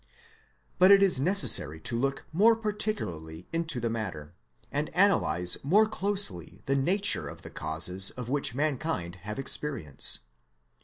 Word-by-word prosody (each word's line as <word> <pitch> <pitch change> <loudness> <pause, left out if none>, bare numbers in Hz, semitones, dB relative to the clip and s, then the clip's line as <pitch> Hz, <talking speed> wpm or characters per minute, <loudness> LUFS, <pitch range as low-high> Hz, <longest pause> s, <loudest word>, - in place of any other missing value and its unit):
But 185 +1 +6
it 200 0 +6
is 180 -9 +3
necessary 175 - +4
to 120 - -3
look 135 +3 -3
more 220 +7 +4
particularly 205 - -5
into 165 -5 -1
the 120 - -2
matter, 95 -10 -6 0.4
and 145 +2 -3
analyse 90 - +1
more 205 +10 +3
closely 200 - 0
the 135 - 0
nature 185 +9 +1
of - - -11
the - - -10
causes 90 +5 -1
of 125 -2 -9
which 135 -2 0
mankind 140 - -3
have 100 +4 -8
experience. 120 - 0
135 Hz, 140 wpm, -27 LUFS, -, 0.4 s, But